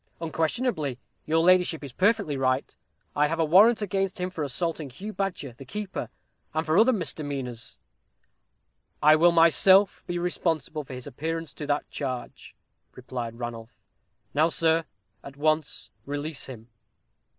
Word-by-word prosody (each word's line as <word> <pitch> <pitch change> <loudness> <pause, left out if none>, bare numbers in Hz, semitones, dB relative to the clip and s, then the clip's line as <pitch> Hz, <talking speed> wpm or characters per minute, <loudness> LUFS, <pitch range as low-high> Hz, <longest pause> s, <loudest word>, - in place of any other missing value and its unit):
"Unquestionably, 160 - -1 0.3
your 160 +1 +2
ladyship 180 -3 +4
is 140 - -7
perfectly 200 - +1
right; 130 0 0 0.4
I 150 +1 +3
have 165 +2 -3
a 165 - +3
warrant 210 +8 +6
against 195 -1 -1
him 180 +1 -2
for 160 -4 -4
assaulting 155 +1 -2
Hugh 200 - -8
Badger, 185 - -3
the 130 - -12
keeper, 200 +9 -5 0.5
and 160 +1 0
for 155 - +1
other 225 +7 +6
misdemeanors." 140 - -4 1.3
"I 155 +1 +8
will 170 +2 +5
myself 185 +4 +5
be 175 -1 -2
responsible 165 -4 -1
for 130 -1 -9
his 125 - -8
appearance 165 +3 -4
to 150 - -7
that 145 0 0
charge," 130 -3 -6 0.4
replied 120 -2 -6
Ranulph. 120 -1 -7 0.6
"Now, 155 +3 +3
sir, 165 -1 +2 0.4
at 140 0 -11
once 155 0 -1 0.2
release 145 +1 -3
him." 120 -3 -10
155 Hz, 140 wpm, -26 LUFS, 135-180 Hz, 1.3 s, I